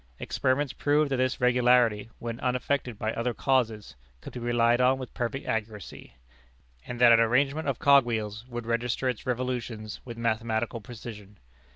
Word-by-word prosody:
Experiments 130 +1 -1
proved 145 0 +1
that 135 - +1
this 130 0 0
regularity, 125 -3 +3
when 115 0 -6
unaffected 125 -1 -1
by 110 0 -2
other 120 0 -2
causes, 115 - 0 0.2
could - - -10
be 125 - -6
relied 120 0 +2
on 130 +1 +4
with 130 -2 -8
perfect 125 +3 -3
accuracy, 105 - -5 0.7
and 120 -1 -6
that 120 -1 +7
an 115 - +7
arrangement 135 +6 +2
of 135 -4 0
cog 140 -1 +6
wheels 110 -2 -3
would 120 -2 -6
register 120 +2 -1
its 125 -2 -3
revolutions 120 -3 -3
with 120 -2 -9
mathematical 115 0 -1
precision. 105 -2 -10
120 Hz, 160 wpm, -27 LUFS, 115-130 Hz, 0.7 s, that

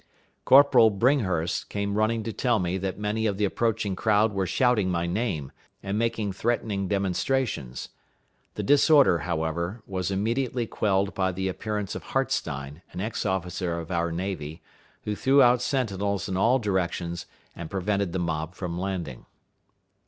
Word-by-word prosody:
Corporal 130 -4 +7
Bringhurst 100 - 0
came 100 -1 -2
running 110 +2 +1
to 115 - -4
tell 120 0 +1
me 90 -1 -1
that 95 0 -3
many 105 +2 -1
of 100 -2 -1
the 105 - +2
approaching 105 -2 -1
crowd 105 +1 +2
were 95 -2 -1
shouting 115 -2 +2
my 85 -1 0
name, 85 - -2 0.3
and 100 0 -2
making 115 -2 0
threatening 105 -2 -1
demonstrations. 100 - -1 0.7
The - - -3
disorder, 140 - +5
however, 85 +5 -3
was 95 -1 -3
immediately 115 +5 -1
quelled 100 -2 0
by 95 -1 0
the 95 +1 -3
appearance 105 +1 -3
of - - -5
Hartstein, 70 +3 -2
an - - -7
ex 110 +1 -2
officer 90 -2 -2
of 85 +2 -7
our 85 -1 0
navy, 85 -3 -4 0.4
who 105 - -2
threw 135 +6 +3
out 120 0 +4
sentinels 100 -7 -1
in 95 - -3
all 115 +8 +4
directions, 90 -5 -2 0.3
and 85 -2 -7
prevented 100 -1 -1
the 95 - -2
mob 80 -1 -3
from 90 -2 -4
landing. 90 -9 -4
100 Hz, 150 wpm, -26 LUFS, 90-110 Hz, 0.7 s, Corporal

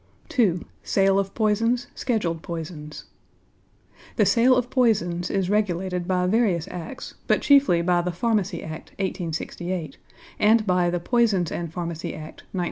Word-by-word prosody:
II. 180 -7 +3 0.2
SALE 195 0 +2
OF 195 -1 -2
POISONS; 230 +3 +1
SCHEDULED 185 -10 -1
POISONS 160 -3 -7 1.1
The - - +3
sale 250 +2 +5
of 250 0 -1
poisons 180 -9 +1
is 195 -2 0
regulated 185 -3 0
by 180 -1 +1
various 185 -4 +1
Acts, 180 +8 -7
but - - +2
chiefly 275 -12 +5
by 175 0 +2
the 180 +1 -2
Pharmacy 195 -1 -1
Act, 155 0 -8
1868, 175 -3 -4 0.4
and 215 +1 +4
by 180 -2 +2
the 175 0 -1
Poisons 205 -4 +1
and 170 -2 -4
Pharmacy 170 -1 -4
Act, 155 0 -10
1908. - - -26
180 Hz, 140 wpm, -24 LUFS, 170-215 Hz, 1.1 s, sale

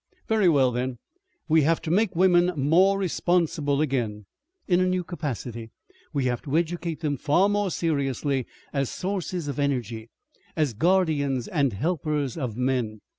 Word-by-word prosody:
"Very 215 -5 +3
well, 135 -5 +4
then, 125 +1 -2 0.5
we 160 0 +4
have 165 +3 +2
to 160 - -2
make 200 0 +2
women 180 0 +4
more 170 +8 +4
responsible 165 -6 0
again. 115 -8 -1 0.4
In 180 -2 +3
a 185 - +2
new 185 0 0
capacity. 125 - -5 0.4
We 140 -4 -1
have 120 -2 -1
to 145 +2 -1
educate 170 -1 -2
them 145 -3 -1
far 165 +9 +3
more 205 -1 0
seriously 140 -5 -1 0.3
as 140 -3 0
sources 180 -4 -3
of 140 -1 -4
energy 120 -5 -2 0.5
as 150 -6 +1
guardians 145 - +1
and 140 - +1
helpers 150 - -1
of 125 -8 -4
men. 125 -5 -1
150 Hz, 150 wpm, -25 LUFS, 130-175 Hz, 0.5 s, well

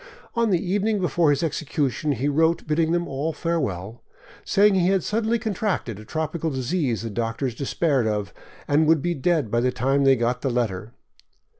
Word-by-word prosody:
On 235 -2 +1
the 185 - +3
evening 205 +4 0
before 175 -3 +2
his 145 +2 +1
execution 150 -2 -1
he 135 +3 -2
wrote 160 +3 +2
bidding 160 +1 +1
them 175 0 0
all 145 +4 -2
farewell, 120 - -3 0.4
saying 205 +1 +4
he 180 -2 +2
had 190 -1 +2
suddenly 225 +2 0
contracted 200 - -2
a 110 - -11
tropical 160 +3 -2
disease 130 - -1
the 115 - -4
doctors 115 +4 -2
despaired 135 0 0
of, 105 -4 -2 0.3
and 150 +2 +3
would 160 -3 +3
be 175 - 0
dead 155 -5 0
by 120 - +2
the 125 +1 +1
time 135 +3 +1
they 135 -1 +6
got 120 0 -1
the 135 - 0
letter. 115 -2 -2
150 Hz, 180 wpm, -24 LUFS, 125-175 Hz, 0.4 s, they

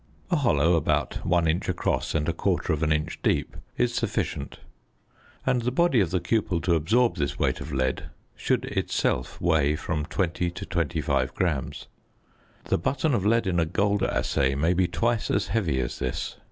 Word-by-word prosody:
A - - +4
hollow 85 - +3
about 75 -3 0
1 85 -1 +2
inch 80 +2 0
across - - -1
and 75 -1 +1
1/4 80 -2 0
inch 75 +1 -1
deep - - 0 0.2
is - - +1
sufficient; - - -2 0.9
and 125 -2 +2
the 120 - 0
body 155 -2 +3
of 95 -5 +2
the 90 - 0
cupel 90 0 0
to 90 - +2
absorb 95 +6 +2
this 70 -3 -2
weight - - 0
of 80 - -6
lead 65 -1 -1 0.3
should - - 0
itself 65 - -1
weigh 75 -4 +2
from 75 -2 -3
20 90 -1 -1
to 90 +1 -7
25 85 -6 -1
grams. 80 -8 -2 0.8
The - - 0
button 140 - 0
of 105 -4 +1
lead 115 +1 +3
in 90 -2 +1
a 80 - +2
gold 100 +4 +1
assay 70 0 +1
may 80 +5 +2
be 90 0 +2
twice 110 +6 0
as 100 - 0
heavy 85 -12 0
as - - -3
this. 65 - -3
85 Hz, 170 wpm, -26 LUFS, 75-100 Hz, 0.9 s, A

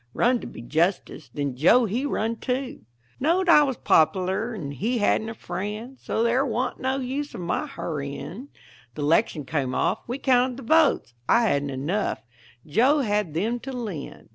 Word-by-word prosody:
Run 245 +1 +3
to - - -8
be - - -10
justice, 165 +9 -1
then 140 -3 -3
Joe 220 - +5
he 240 +7 -1
run, 225 -3 -1
too; 255 - -3 0.3
Knowed 345 +7 +2
I 335 -3 +8
was 270 -5 0
pop'lar 190 +7 +2
and 145 -8 -5
he 230 - -1
hadn't 220 +1 +1
a 225 - -6
friend, 210 +7 -5
So 225 - -1
there 240 +3 +2
wa'n't 250 -1 -2
no 260 +1 0
use 275 +3 -4
of - - -6
my 175 - -2
hurrying. 165 - -6 0.5
The 150 - -4
'lection 155 -1 +2
came 135 -4 -2
off, 180 +6 +1
we 245 +3 -3
counted 255 -2 +2
the 270 - -8
votes; 300 - +3 0.2
I 235 - +5
hadn't 140 -9 +1
enough; 145 - -2 0.4
Joe 255 - +3
had 205 - -1
them 225 +8 0
to 270 - -7
lend. 215 - -6
225 Hz, 175 wpm, -25 LUFS, 165-255 Hz, 0.5 s, I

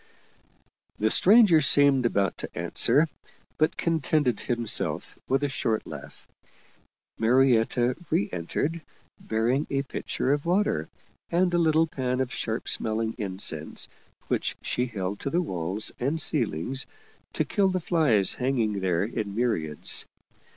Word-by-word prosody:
The 110 +1 +1
stranger 200 -5 +6
seemed 140 -2 +4
about 100 -4 0
to - - -5
answer, 155 +3 +3 0.5
but 155 - +1
contented 155 -6 0
himself 120 -2 0
with 135 +2 0
a - - +2
short 115 -5 -2
laugh. - - -11 0.9
Marietta 120 0 +2
reentered, 100 - -2 0.4
bearing 120 +6 -1
a 140 0 -1
pitcher 130 0 -2
of 145 0 -2
water 175 - 0 0.4
and 175 +1 +1
a 175 - +2
little 160 -1 +3
pan 130 -4 -3
of 130 -1 -2
sharp 110 0 -4
smelling 110 0 -1
incense, 95 -6 0 0.4
which - - -1
she 125 - -1
held 100 -3 -4
to - - -3
the 170 - 0
walls 95 - -2
and 140 +6 -1
ceilings 130 - 0 0.5
to - - -1
kill 200 -3 +1
the 185 0 -1
flies 155 - +2
hanging 120 -6 -1
there 90 -2 0
in 105 -2 -4
myriads. 85 -11 +2
125 Hz, 130 wpm, -26 LUFS, 110-155 Hz, 0.9 s, stranger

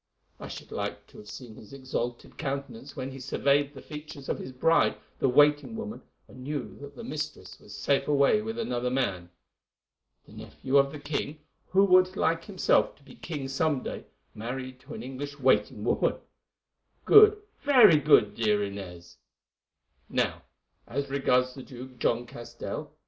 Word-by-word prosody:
I - - -7
should - - -9
like - - -4
to - - -14
have 105 - -12
seen 120 0 -9
his 110 +3 -14
exalted 125 -3 -4
countenance 140 -2 -5
when 130 +1 -5
he 135 - -9
surveyed 140 +2 +1
the 135 - -10
features 150 -2 -9
of - - -1
his 130 - -7
bride, 165 +6 +3 0.2
the 135 - +3
waiting 145 - +4
woman, 225 0 -6 0.3
and 130 - -12
knew 145 +1 -4
that 140 0 -10
the - - -8
mistress 150 +1 -6
was - - -12
safe 140 -1 +1
away 145 +8 +4
with 225 +1 -5
another 125 - -1
man. 95 -10 -1 1.0
The - - -18
nephew 135 +1 -2
of 140 0 +4
the 150 - -7
king, 145 +1 -4 0.3
who 195 +1 +4
would 185 0 +5
like 165 0 +1
himself 190 -4 +2
to 145 - -25
be 135 -2 -14
king 150 -5 -6
some 135 0 0
day, - - -6 0.3
married 130 +3 -6
to - - -10
an - - -7
English 140 +3 -7
waiting 105 -5 +2
woman! - - +1 0.9
Good, 425 0 +8 0.2
very 245 - +7
good, 125 -9 +5
dear 105 -2 +1
Inez. 90 -4 -8 0.9
"'Now, - - 0 0.5
as 140 +2 -3
regards 130 -2 +2
the 130 - -9
Jew, 130 0 -10
John 120 +1 +1
Castell. 120 0 -7
140 Hz, 165 wpm, -28 LUFS, 125-150 Hz, 1.0 s, Good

